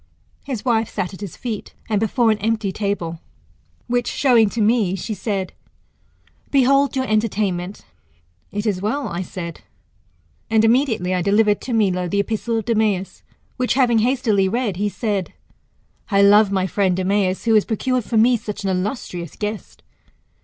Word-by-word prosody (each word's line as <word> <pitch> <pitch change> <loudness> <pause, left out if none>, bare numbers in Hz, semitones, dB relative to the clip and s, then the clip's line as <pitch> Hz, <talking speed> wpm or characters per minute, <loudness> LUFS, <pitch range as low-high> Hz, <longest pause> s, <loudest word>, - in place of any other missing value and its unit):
His 260 -4 -5
wife 225 -3 +1
sat 190 -2 -3
at 190 - -11
his 200 -5 -7
feet, 225 -4 -6
and 215 -3 +1
before 225 +2 +2
an 215 - -1
empty 215 -1 0
table; 185 -5 -3 0.7
which 245 0 0
showing 235 -6 +3
to 235 - -5
me, 215 -3 +2
she 205 +4 -4
said, 195 -2 -3 1.0
Behold 275 +1 +3
your 260 0 0
entertainment. 205 -4 -1 0.7
It 205 +1 -3
is 195 -4 0
well, 250 +8 -1
I 170 +1 -3
said, 170 -2 -7 0.9
and 220 0 +4
immediately 225 -7 +2
I 180 - 0
delivered 205 +2 +2
[to 255 - -4
Milo] 185 -5 +1
the 200 - 0
epistle 225 +2 -1
of 225 - -3
Demeas, 215 -5 0 0.4
which 250 -1 0
having 245 -4 +3
hastily 225 -5 +2
read, 225 -4 -1
he 205 +1 0
said, 205 -4 -2 0.8
I 200 -2 +4
love 205 0 +6
my 190 -1 +1
friend 190 -1 0
Demeas, 190 +1 0
who 225 - +3
has 215 -2 +5
procured 250 +3 -1
for 225 - -1
me 240 +3 +5
such 210 -1 -6
an 195 - 0
illustrious 180 - -4
guest. 210 0 -6
210 Hz, 160 wpm, -21 LUFS, 195-230 Hz, 1.0 s, love